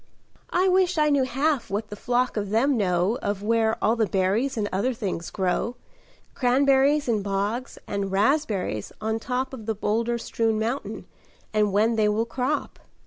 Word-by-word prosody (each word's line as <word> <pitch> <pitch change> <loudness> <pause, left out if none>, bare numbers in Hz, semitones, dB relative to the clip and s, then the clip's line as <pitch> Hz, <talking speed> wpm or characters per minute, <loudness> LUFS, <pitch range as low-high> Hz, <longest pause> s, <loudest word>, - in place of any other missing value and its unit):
"I 365 +2 +2
wish 365 -2 +3
I 300 -1 +3
knew 275 -2 +3
half 275 +1 0
what 205 +3 -3
the - - -4
flock 245 +3 0
of 205 -2 -2
them 250 +7 +2
know 190 +1 +1
Of 205 0 -2
where 225 0 +2
all 220 +2 +3
the 225 -2 +1
berries 200 +9 0
and 210 -2 0
other 240 +7 0
things 185 -6 -4
grow, 195 +5 -1 0.6
Cranberries 275 +3 +3
in 220 -3 +1
bogs 205 +6 -2
and 200 -1 -3
raspberries 205 - 0
on 220 +1 -1
top 260 +2 -2
Of 225 -4 -8
the 220 - 0
boulder 230 +3 0
strewn 225 -1 -1
mountain, 230 +6 -3 0.5
and 210 -1 +2
when 220 +3 +2
they 210 -1 +3
will 215 +2 +1
crop. 255 +5 -2
225 Hz, 170 wpm, -25 LUFS, 205-260 Hz, 0.6 s, wish